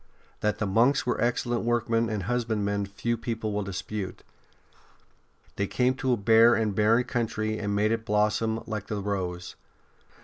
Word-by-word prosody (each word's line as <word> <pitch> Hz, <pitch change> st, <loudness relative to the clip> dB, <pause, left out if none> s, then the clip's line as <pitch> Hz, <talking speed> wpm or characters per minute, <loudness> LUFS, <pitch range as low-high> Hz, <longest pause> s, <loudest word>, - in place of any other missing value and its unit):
That 105 Hz, 0 st, 0 dB
the 110 Hz, -, -1 dB
monks 115 Hz, +8 st, +3 dB
were 125 Hz, -, -1 dB
excellent 120 Hz, 0 st, 0 dB
workm.en 115 Hz, -1 st, +1 dB
and 105 Hz, -3 st, -2 dB
husbandmen 105 Hz, -3 st, -1 dB
few 120 Hz, +4 st, -2 dB
people 115 Hz, -2 st, -3 dB
will 105 Hz, -, -1 dB
dispute. 100 Hz, 0 st, -5 dB, 1.3 s
They 100 Hz, -, 0 dB
came 125 Hz, +4 st, +1 dB
to 135 Hz, -1 st, 0 dB
a -, -, +1 dB
bare 115 Hz, +3 st, +5 dB
and 110 Hz, -2 st, 0 dB
barren 110 Hz, +4 st, +3 dB
country 110 Hz, -3 st, -2 dB
and 100 Hz, -1 st, -2 dB
made 105 Hz, +1 st, +2 dB
it 115 Hz, 0 st, -1 dB
blossom 110 Hz, +1 st, 0 dB
like 110 Hz, -3 st, -5 dB
the 105 Hz, -2 st, -3 dB
rose. 90 Hz, -3 st, -4 dB
110 Hz, 160 wpm, -27 LUFS, 100-115 Hz, 1.3 s, bare